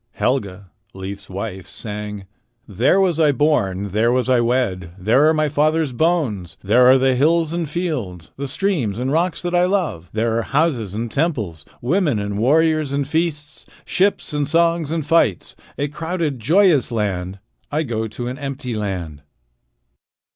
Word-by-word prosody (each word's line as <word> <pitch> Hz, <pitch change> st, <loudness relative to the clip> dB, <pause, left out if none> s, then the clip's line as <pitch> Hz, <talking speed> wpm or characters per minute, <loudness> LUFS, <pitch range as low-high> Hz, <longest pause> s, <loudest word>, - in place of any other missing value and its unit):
Helga, 100 Hz, -7 st, -2 dB, 0.2 s
Leif's 95 Hz, +1 st, -7 dB
wife, 95 Hz, -1 st, -6 dB
sang: 105 Hz, -2 st, -6 dB, 0.4 s
"There 115 Hz, -, +2 dB
was 180 Hz, -4 st, +2 dB
I 155 Hz, -2 st, +5 dB
born. 100 Hz, -9 st, +1 dB
There 110 Hz, +5 st, +2 dB
was 130 Hz, +1 st, 0 dB
I 125 Hz, -1 st, +4 dB
wed. 110 Hz, -8 st, -1 dB
There 115 Hz, +10 st, +3 dB
are -, -, +3 dB
my 155 Hz, 0 st, +2 dB
father's 155 Hz, 0 st, +1 dB
bones. 130 Hz, -, 0 dB
There 120 Hz, +6 st, +5 dB
are 130 Hz, +1 st, +7 dB
the 130 Hz, 0 st, +3 dB
hills 160 Hz, +4 st, +2 dB
and 170 Hz, -3 st, -2 dB
fields, 130 Hz, -, -4 dB
The 140 Hz, +1 st, -4 dB
streams 140 Hz, -, -1 dB
and 130 Hz, +2 st, -2 dB
rocks 165 Hz, +3 st, 0 dB
that 175 Hz, 0 st, -2 dB
I 175 Hz, 0 st, +4 dB
love. 180 Hz, -, -1 dB
There 115 Hz, +1 st, 0 dB
are -, -, +1 dB
houses 120 Hz, -, 0 dB
and 115 Hz, +1 st, -3 dB
temples, 110 Hz, -, -2 dB, 0.2 s
Women 155 Hz, -, +1 dB
and 100 Hz, 0 st, -3 dB
warriors 155 Hz, +3 st, +2 dB
and 140 Hz, -1 st, -1 dB
feasts, 155 Hz, -1 st, -3 dB, 0.2 s
Ships 195 Hz, -4 st, 0 dB
and 145 Hz, -1 st, 0 dB
songs 165 Hz, -2 st, +2 dB
and 160 Hz, -2 st, -2 dB
fights 150 Hz, -, +1 dB, 0.2 s
A 145 Hz, -, -1 dB
crowded, 160 Hz, -2 st, -3 dB
joyous 160 Hz, -, +3 dB
land. 95 Hz, -4 st, -2 dB, 0.3 s
I 155 Hz, +2 st, 0 dB
go 110 Hz, -5 st, -2 dB
to 120 Hz, +3 st, -6 dB
an 130 Hz, +3 st, -5 dB
empty 135 Hz, -3 st, -4 dB
land." 90 Hz, -8 st, -4 dB
130 Hz, 160 wpm, -20 LUFS, 105-160 Hz, 0.4 s, are